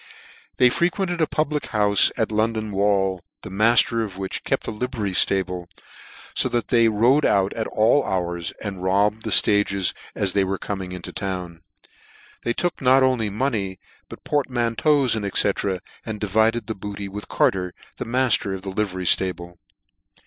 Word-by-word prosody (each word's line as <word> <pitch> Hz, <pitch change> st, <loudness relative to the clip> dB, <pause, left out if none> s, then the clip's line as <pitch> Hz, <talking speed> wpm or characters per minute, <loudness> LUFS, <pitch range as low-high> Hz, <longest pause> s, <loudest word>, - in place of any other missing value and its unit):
They 125 Hz, -1 st, +5 dB
frequented 175 Hz, +2 st, -1 dB
a 160 Hz, -, +2 dB
public 150 Hz, -1 st, -1 dB
houfe 105 Hz, -2 st, +3 dB
at 110 Hz, -2 st, -1 dB
London 110 Hz, 0 st, -1 dB
Wall, 95 Hz, -2 st, 0 dB, 0.2 s
the -, -, -8 dB
mafter 115 Hz, +3 st, +3 dB
of 100 Hz, -4 st, -7 dB
which 95 Hz, -1 st, -5 dB
kept -, -, -1 dB
a -, -, -4 dB
livery 110 Hz, -3 st, -3 dB, 0.2 s
liable, 90 Hz, -2 st, -2 dB, 0.7 s
fo -, -, +3 dB
that 120 Hz, -1 st, -2 dB
they 115 Hz, -2 st, +4 dB
rode 120 Hz, +7 st, +3 dB
out 95 Hz, 0 st, +2 dB
at 110 Hz, -, -3 dB
all 115 Hz, +6 st, +2 dB
hours, 85 Hz, -2 st, -3 dB
and 100 Hz, -3 st, -5 dB
robbed 100 Hz, +4 st, +1 dB
the -, -, -2 dB
ftages, 100 Hz, -3 st, +3 dB, 0.2 s
as 95 Hz, -2 st, -1 dB
they 100 Hz, -, +2 dB
were 95 Hz, 0 st, -2 dB
coming 95 Hz, -2 st, -5 dB
into 90 Hz, -1 st, -7 dB
town. 90 Hz, -4 st, -5 dB, 0.8 s
They 120 Hz, -, -1 dB
took 175 Hz, +7 st, -2 dB
not 130 Hz, +1 st, +5 dB
only 125 Hz, -5 st, +1 dB
money, 105 Hz, -4 st, -2 dB, 0.3 s
but -, -, -11 dB
portmanteaus, 130 Hz, 0 st, +1 dB
&c. 110 Hz, -, -1 dB, 0.8 s
and 110 Hz, -2 st, -6 dB
diyided 110 Hz, +3 st, +1 dB
the 110 Hz, -, -4 dB
booty 100 Hz, 0 st, -7 dB
with 105 Hz, +2 st, -8 dB
Carter, 90 Hz, -2 st, 0 dB, 0.2 s
the -, -, -5 dB
mafter 120 Hz, -5 st, +1 dB
of 95 Hz, -, -9 dB
the 95 Hz, -, -5 dB
livery 95 Hz, -2 st, -3 dB
ftable. 90 Hz, -1 st, +1 dB
105 Hz, 160 wpm, -22 LUFS, 95-120 Hz, 0.8 s, They